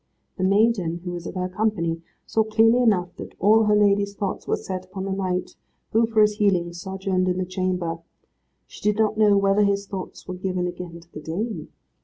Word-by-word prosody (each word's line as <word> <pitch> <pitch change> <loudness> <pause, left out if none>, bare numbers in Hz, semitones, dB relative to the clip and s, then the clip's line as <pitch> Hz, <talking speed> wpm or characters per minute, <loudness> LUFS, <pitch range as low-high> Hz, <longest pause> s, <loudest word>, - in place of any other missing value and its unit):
The - - 0
maiden, 195 -4 +2
who 180 - -3
was 175 -1 -6
of - - -7
her 180 0 -1
company, 185 -4 -1 0.2
saw 220 - +1
clearly 225 +3 +4
enough 185 -7 +2
that - - -9
all 220 +2 +5
her 210 0 +4
lady's 200 -1 +3
thoughts 195 -2 -4
were - - +2
set 185 -1 -5
upon 190 +1 -6
the 195 - -3
knight, 185 -2 -2 0.4
who, 225 +1 +3
for 225 -1 +3
his 210 0 +2
healing, 180 -5 +2
sojourned 190 +1 -2
in 180 0 0
the 185 - -1
chamber. 180 -2 -2 0.7
She - - -14
did 210 0 +1
not 220 -1 +2
know 210 -2 +5
whether 195 +1 +3
his 200 0 +1
thoughts 195 -2 -7
were 185 - -4
given 185 0 -2
again 175 -1 -6
to 170 +1 -22
the 150 - -7
dame. 205 +9 -4
190 Hz, 205 wpm, -24 LUFS, 180-210 Hz, 0.7 s, all